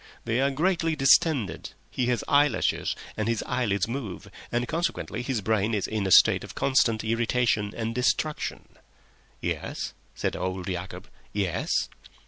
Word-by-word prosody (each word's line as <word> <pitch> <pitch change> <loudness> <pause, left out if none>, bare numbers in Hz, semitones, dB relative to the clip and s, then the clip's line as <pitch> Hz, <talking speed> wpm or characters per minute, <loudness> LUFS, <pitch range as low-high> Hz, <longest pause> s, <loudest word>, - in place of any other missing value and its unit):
They 115 +3 +1
are 140 - +3
greatly 165 +2 +1
distended, 140 - +3 0.2
he 125 - -1
has 125 -3 0
eyelashes, 145 -4 +2 0.2
and 110 0 -2
his 115 -1 0
eyelids 110 -7 0
move, 115 -7 -6 0.2
and 120 +1 0
consequently 160 -7 -2
his 125 -3 -2
brain 110 +1 +1
is 100 - -1
in 105 -3 -2
a - - -2
state - - +7
of - - -10
constant 115 -5 +2
irritation 115 -2 +1
and 115 0 -2
distraction." 130 +5 -1 0.7
"Yes?" - - -3 0.2
said - - -2
old 90 0 -3
Yacob. 90 0 -5 0.3
"Yes?" 100 -4 0
115 Hz, 140 wpm, -27 LUFS, 105-135 Hz, 0.7 s, state